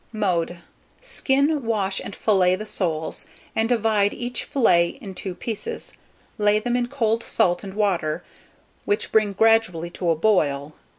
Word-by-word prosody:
Mode. 180 -6 -1 0.5
Skin, 285 - +1
wash, 205 -4 0
and 200 - -6
fillet 185 -4 +3
the 215 +3 -6
soles, 160 -7 -2 0.3
and 225 +1 +1
divide 220 -4 +2
each 245 0 -4
fillet 170 -10 +2
in 200 -8 -8
2 185 -1 -6
pieces; 245 - -5 0.5
lay 210 0 +4
them 240 +3 -1
in 245 -1 0
cold 230 -4 0
salt 175 -4 +1
and 195 -1 -8
water, 180 -7 0 0.6
which 205 +2 -1
bring 215 -2 +3
gradually 220 -6 +2
to 175 0 -2
a 165 - +3
boil. 155 -6 +1
210 Hz, 150 wpm, -23 LUFS, 180-225 Hz, 0.6 s, lay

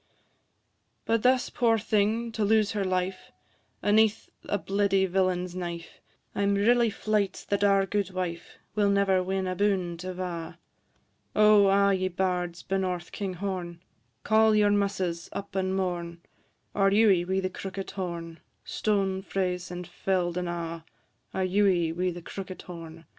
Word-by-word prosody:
But 230 -1 +1
thus, 255 +1 +3
poor 230 -2 +2
thing, 220 +2 0
to 220 -1 -2
lose 215 0 +3
her 205 -2 -1
life, 185 0 -2 0.5
Aneath 215 +1 +3 0.2
a 205 - +1
bleedy 195 0 +1
villain's 180 -1 0
knife, 170 -2 -6 0.3
I - - -2
'm 200 0 +2
really 235 +3 +4
fleyt 210 -2 -1
that 200 0 +1
our 195 -1 +4
guidwife 185 -4 -3 0.2
Will 205 -1 +2
never 200 -2 +3
win 190 +1 -1
aboon 185 -2 0
't 180 - -6
ava: 180 -3 -5 0.8
O! 210 -1 +6
a' 200 0 +4
ye 185 0 0
bards 180 -1 -2
benorth 185 -2 -2
Kinghorn, 185 -3 -4 0.4
Call 220 0 +4
your 205 -1 +4
muses 190 -4 -1
up 200 - -6
and 190 0 0
mourn, 175 -3 -3 0.5
Our 195 -1 +3
Ewie 200 -3 +4
wi' 190 +2 0
the 185 -1 -2
crookit 195 0 -6
horn 170 -3 -5 0.3
Stown 195 -3 0
frae 190 -2 -1
's, 180 0 -9
and 180 0 -6
fell'd 175 0 -1
and 180 -1 -2
a'! 165 -1 -4 0.5
Our 190 - -1
Ewie 185 -4 +2
wi' 180 +2 0
the 175 -1 -7
crookit 190 +1 -7
horn, 165 -2 -9
&c. 165 - -17
190 Hz, 150 wpm, -27 LUFS, 180-205 Hz, 0.8 s, O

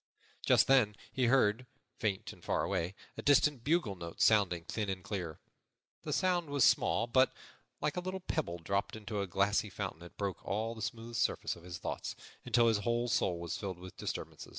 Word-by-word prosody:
Just - - +5
then 125 -6 +4 0.2
he 130 - +1
heard, 120 -1 +3 0.3
faint 100 -4 -1
and - - -18
far - - 0
away, 90 +4 -1 0.2
a - - -3
distant 145 -2 +4
bugle 155 - +2
note 85 -2 -8
sounding 100 -6 +4
thin 105 +3 -3
and 95 -1 -3
clear. 90 -6 -4 0.6
The - - -5
sound 180 -4 +1
was 140 -2 +2
small, 115 - +4
but, 130 +2 +4 0.5
like 150 - 0
a - - 0
little 185 +1 -4
pebble 155 - -2
dropped 100 +4 -1
into 105 -1 -4
a 100 - -2
glassy 100 +4 +1
fountain, 85 -2 -5
it 85 - -12
broke 100 -3 -3
all 110 +3 -1
the 110 - -9
smooth 115 +1 -4
surface - - 0
of 85 - -14
his 90 0 -7
thoughts, - - -4 0.3
until 120 -1 +4
his 110 -3 +3
whole 120 +3 0
soul 90 -6 +1
was 85 -1 -4
filled 95 -3 -4
with 90 +1 -10
disturbance. - - -5
105 Hz, 195 wpm, -33 LUFS, 95-125 Hz, 0.6 s, Just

